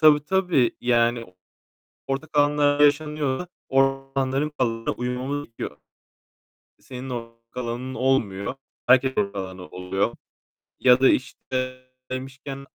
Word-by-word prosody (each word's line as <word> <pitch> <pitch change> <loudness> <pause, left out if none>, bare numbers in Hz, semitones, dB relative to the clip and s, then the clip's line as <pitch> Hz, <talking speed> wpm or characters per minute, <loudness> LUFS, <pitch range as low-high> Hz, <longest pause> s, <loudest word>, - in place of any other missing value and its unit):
Tabii, 150 -1 +7
tabii. 180 -9 +2
Yani 120 -1 +2 0.8
ortak 145 +3 -3
alanlarda 145 0 +4
yaşanıyorsa 150 +1 +1 0.2
o 135 0 +4 0.3
alanların 135 +2 0
kuralına 115 -2 0
uymamız 125 +4 -3
gerekiyor. 115 - -7 1.0
Senin 130 0 -8
ortak 115 -1 -6 0.2
alanın 125 +2 -3
olmuyor, 125 -4 0 0.3
herkesin 130 -2 +5
ortak 100 0 -4
alanı 95 -1 -6
oluyor. 90 +2 -2 0.6
Ya 125 0 +6
da, 135 - +7
işte, 130 0 -2 0.3
demişken 135 +1 -6
130 Hz, 110 wpm, -24 LUFS, 120-145 Hz, 1.0 s, Tabii